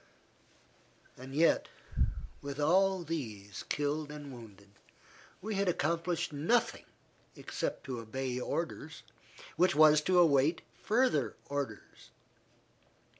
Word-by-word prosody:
As 130 - -10
yet, 150 +5 +3 0.7
with 140 0 -6
all 185 +4 +3
these 110 -12 -5
killed 145 +1 -1
and 145 -2 -8
wounded, 105 -4 -13 0.7
we 215 +1 -3
had 195 -1 +1
accomplished 170 0 -1
nothing 170 +12 +1 0.5
except - - -4
to 130 -4 -5
obey 125 +3 -3
orders 160 +2 -4 0.5
which 180 -2 +4
was 155 0 +7
to 185 +3 +2
await 155 -1 +4 0.2
further 220 - +2
orders. 145 -1 -5
150 Hz, 100 wpm, -32 LUFS, 135-170 Hz, 0.7 s, was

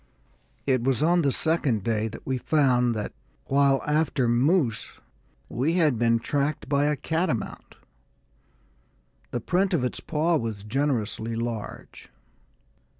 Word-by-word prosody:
It 130 -3 +1
was 130 0 +1
on 175 +2 +4
the 140 -3 +2
second 145 - +1
day 110 0 0
that 110 - -9
we 130 -1 -1
found 125 -5 +2
that, 105 - -4 0.3
while 140 0 +3
after 150 -4 +1
moose, 125 +1 +1 0.5
we 135 - 0
had 155 -9 +2
been 115 -1 +3
tracked 140 +5 -2
by 140 +1 +2
a 150 0 +2
catamount. 160 - -3 1.5
The 120 - -3
print 185 - +1
of 140 - 0
its 125 - -2
paw 160 +2 +1
was 110 -6 -4
generously 115 -2 -1
large. 115 -2 -6
135 Hz, 130 wpm, -26 LUFS, 115-150 Hz, 1.5 s, on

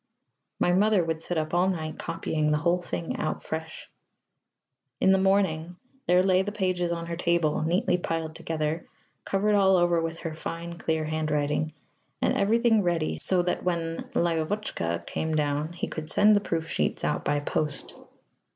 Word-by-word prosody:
My 175 - +3
mother 205 0 +4
would 160 -1 -2
sit 175 +1 -2
up 155 0 -2
all 180 +2 +3
night 160 -4 -3
copying 155 -1 -1
the 150 - +3
whole 170 +3 +1
thing 90 - -4
out - - -2
afresh. - - -6 1.1
In 190 - +4
the 190 - +4
morning 190 -4 +1 0.3
there 180 +1 +5
lay 185 -1 +4
the 205 +2 -3
pages 185 -4 0
on 170 0 -3
her 170 0 -4
table, 170 -3 +1
neatly 175 +2 +1
piled 165 -2 -3
together, 160 0 -3 0.4
covered 205 +2 +1
all 190 -2 +5
over 175 -1 +3
with 165 0 -3
her 165 -2 -4
fine, 170 +2 -6
clear 160 -1 0
handwriting, 155 0 -1 0.4
and - - +1
everything 225 +2 +3
ready, 170 -4 0
so 180 -2 +1
that 180 - -1
when 165 -2 -1 0.2
"Lyóvotchka" 165 - -1
came 160 0 -2
down 150 +1 0
he 175 - -3
could 155 -1 -6
send 210 +5 +5
the 205 - +3
proof 165 -4 -2
sheets - - -1
out - - 0
by 145 0 +1
post. 145 0 -2
170 Hz, 170 wpm, -27 LUFS, 155-185 Hz, 1.1 s, there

